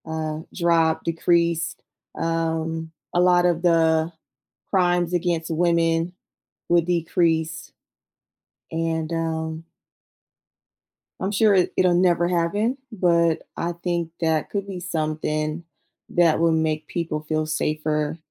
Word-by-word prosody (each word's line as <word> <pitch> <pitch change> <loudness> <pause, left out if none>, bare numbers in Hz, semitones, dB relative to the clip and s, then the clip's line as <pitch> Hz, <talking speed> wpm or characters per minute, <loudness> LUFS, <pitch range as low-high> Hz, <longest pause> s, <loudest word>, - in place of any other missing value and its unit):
uh, 160 -1 -3 0.2
drop, 165 -2 +2
decrease. 170 -1 +1 0.4
Um, 165 0 -2 0.2
a 175 - +2
lot 180 0 +4
of 175 -1 +2
the 165 -2 +3 0.6
crimes 175 -2 +2
against 170 -2 0
women 165 0 +1 0.6
would 170 -1 +4
decrease. 165 -2 0 1.0
And, 160 0 -2
um 160 -1 -3 1.6
I'm 190 - -2
sure 210 0 +4
it 185 -2 +2
it'll 180 -1 +4
never 175 -1 +3
happen, 180 +8 0
but, 170 -5 +2
I 170 +1 -2
think 170 -2 -1
that 160 -2 +1
could 200 -1 -3
be 190 -2 -5
something 155 -1 -2 0.5
that 170 -3 +3
will 165 0 +3
make 155 -1 0
people 165 -3 -3
feel 155 0 -1
safer, 155 0 -1
165 Hz, 110 wpm, -23 LUFS, 160-175 Hz, 1.6 s, lot